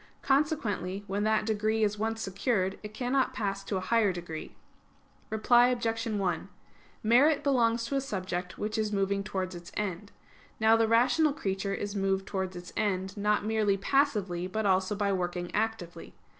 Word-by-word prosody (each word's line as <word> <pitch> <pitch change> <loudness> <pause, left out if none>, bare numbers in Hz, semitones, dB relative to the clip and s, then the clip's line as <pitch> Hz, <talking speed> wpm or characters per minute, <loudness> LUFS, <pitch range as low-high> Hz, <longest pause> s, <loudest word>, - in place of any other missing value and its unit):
Consequently, 225 - 0
when 200 +1 -2
that 215 0 +2
degree 220 0 +1
is 210 0 0
once 225 +1 -1
secured, 195 -1 -1
it 210 - -8
cannot 255 +4 0
pass 195 -2 -2
to 195 0 -2
a - - -2
higher 220 0 +2
degree. 170 -3 -7 0.7
Reply 240 +3 +4
Obj. 230 -2 -1
1: 200 -5 -1 0.5
Merit 275 +7 +4
belongs 235 -4 +2
to 275 - -3
a 275 - +2
subject 185 -7 -4
which 215 +1 -2
is 215 -1 0
moving 200 0 0
towards 190 -2 -3
its 175 0 -10
end. 205 -1 -3 0.5
Now 220 0 +5
the 225 0 +3
rational 255 +7 +3
creature 195 -7 -2
is 205 +1 -4
moved 195 -1 0
towards 190 -2 -3
its 175 0 -9
end, 190 -2 -1
not 210 0 +1
merely 215 -2 +2
passively, 200 -7 +1
but 215 +3 -2
also 190 +1 +2
by 200 -1 0
working 175 -1 -3
actively. 220 -5 -3
210 Hz, 165 wpm, -29 LUFS, 190-225 Hz, 0.7 s, Now